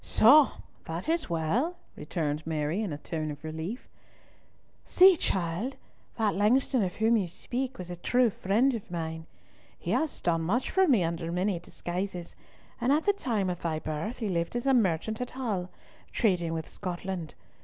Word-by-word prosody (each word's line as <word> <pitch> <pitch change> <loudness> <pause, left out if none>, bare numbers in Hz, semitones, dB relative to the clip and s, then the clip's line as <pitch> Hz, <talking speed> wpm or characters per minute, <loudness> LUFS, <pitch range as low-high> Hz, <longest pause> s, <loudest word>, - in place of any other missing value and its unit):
"Soh! 280 +5 +6 0.3
that 165 +2 -5
is 330 0 0
well," 195 - 0 0.2
returned 155 -2 -3
Mary, 155 +4 -1
in 205 -6 -2
a 145 - -3
tone 155 +1 -4
of 150 0 -7
relief. 160 +9 -5 1.0
"See, 375 0 +7
child. 190 - -1 0.4
That 220 -3 +2
Langston 245 +5 +3
of 180 0 -2
whom 225 +2 +3
you 195 -4 0
speak 255 +9 -4
was 180 -1 -6
a - - -4
true 245 +6 +2
friend 225 +9 +2
of 225 -4 -5
mine. 160 -1 -4 0.5
He - - -4
has 315 -1 0
done 165 -1 +1
much 210 +10 0
for 380 0 +4
me 235 - +4
under 165 0 -2
many 180 +1 0
disguises, 180 0 -5 0.5
and 245 +3 +2
at 300 +3 +2
the 405 - +4
time 225 - -1
of 180 -1 -3
thy 160 -2 -1
birth 155 +9 -4
he 220 - -2
lived 170 +1 -1
as 240 - -2
a 270 - +4
merchant 215 0 +1
at 250 - -3
Hull, 210 -9 -3 0.4
trading 180 -7 +1
with 160 -1 -4
Scotland. 180 -3 -5
190 Hz, 175 wpm, -29 LUFS, 165-245 Hz, 1.0 s, See